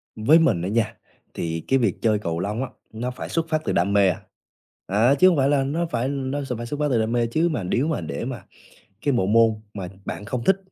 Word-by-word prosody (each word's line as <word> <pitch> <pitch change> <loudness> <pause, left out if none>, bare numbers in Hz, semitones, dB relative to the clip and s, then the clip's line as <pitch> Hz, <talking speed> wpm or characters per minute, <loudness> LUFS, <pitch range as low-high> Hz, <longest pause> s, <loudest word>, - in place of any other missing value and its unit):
Với 140 +10 +5
mình 160 - +2
á 90 - -2
nha, 115 +1 0 0.4
thì 80 -1 -3
cái 135 - +3
việc 110 -7 0
chơi 110 -2 +2
cầu 85 -4 -3
lông 105 +7 -2
á, 130 - -5 0.2
nó 120 +3 -3
phải 125 - -7
xuất 165 -1 -1
phát 155 -1 +1
từ - - 0
đam 100 +4 +1
mê 100 -2 +5
à. 90 - -3 0.6
Ờ, 110 +8 +3
chứ 185 +6 +6
hông 175 -5 +4
phải 135 0 +3
là 140 -2 +3
nó 155 +6 -1
phải 125 -6 -2
nó 140 0 -2
s 135 - -7
phải 120 - -5
xuất 145 +5 -5
phát 150 - +2
từ 120 - +3
đam 110 +1 0
mê, 120 -1 +1
chứ 160 +9 +1
mà 135 - -2
nếu 120 - 0
mà 160 - -1
để 75 -4 -4
mà - - -5 0.6
cái 145 - +3
bộ 120 -6 +2
môn 110 +1 +3
mà 95 -3 -5 0.2
bạn 95 +4 -5
không 120 +2 -3
thích, 195 - +4
120 Hz, 265 wpm, -23 LUFS, 105-140 Hz, 0.6 s, chứ